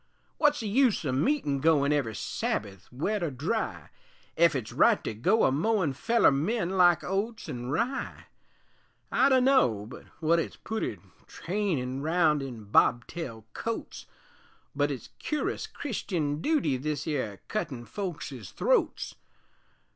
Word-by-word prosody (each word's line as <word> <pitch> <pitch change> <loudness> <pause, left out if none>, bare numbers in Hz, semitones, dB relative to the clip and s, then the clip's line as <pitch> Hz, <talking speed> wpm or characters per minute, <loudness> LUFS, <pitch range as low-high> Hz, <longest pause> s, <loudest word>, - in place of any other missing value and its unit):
Wut's 295 -3 +3
the 220 - -3
use 235 - +2
o' 135 - 0
meetin' 145 - +1
goin' 150 -1 +3
Every 125 -7 -1
Sabbath, 95 -4 -3
wet 180 +11 -1
or 170 - 0
dry, 155 - -3 0.5
Ef 170 -2 +4
it's 125 -6 -3
right - - +4
to - - -3
go 185 - +2
a - - +4
mowin' 170 +1 +1
Feller 230 - +3
men 175 +7 0
like 175 -3 +4
oats 205 +5 -2
an' 120 0 -5
rye? 235 - -2 0.9
I 270 - +4
dunno 255 - +4
but 120 - -11
wut 165 +1 +3
it's - - -3
pooty 220 - -3 0.3
Trainin' 165 -10 -2
round 160 -1 +2
in 125 -5 -7
bobtail 115 +3 +1
coats 230 0 -5 0.7
But - - +2
it's - - -6
curus 300 -1 -2
Christian 160 - -3
dooty 295 - +1
This 150 +3 -3
'ere 130 - -2
cuttin' 130 - -3
folks's 145 - -6
throats. - - 0
160 Hz, 135 wpm, -28 LUFS, 130-215 Hz, 0.9 s, Ef